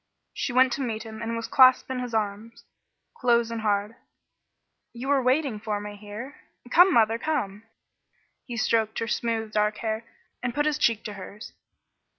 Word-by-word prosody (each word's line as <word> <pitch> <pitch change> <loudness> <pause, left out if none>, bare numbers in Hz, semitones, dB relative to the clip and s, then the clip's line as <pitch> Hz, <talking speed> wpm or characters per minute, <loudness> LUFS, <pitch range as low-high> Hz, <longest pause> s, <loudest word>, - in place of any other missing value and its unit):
She - - -2
went 255 0 +4
to 275 - -3
meet 225 -4 -3
him 220 -1 -9
and 230 0 -3
was 230 -1 -4
clasped 260 0 +5
in 255 - -2
his 245 -2 -4
arms, 215 +2 -3 0.5
close 235 -2 +2
and 230 -1 -3
hard. 210 +1 0 1.0
"You 245 +3 -6
were 280 -1 +3
waiting 255 -2 +1
for 210 -1 -2
me 205 0 -7
here? 210 +7 -9 0.3
Come, 360 +2 +7
mother, 225 -4 +3
come." 210 -9 -2 0.8
He 240 -2 -5
stroked 220 -1 +1
her 225 - -2
smooth, 225 -2 -1
dark 210 0 +1
hair, 220 0 -3 0.4
and 245 -1 -3
put 295 - +1
his 305 -2 0
cheek 230 -2 +2
to 210 - -6
hers. 200 +2 -10
230 Hz, 170 wpm, -26 LUFS, 215-250 Hz, 1.0 s, Come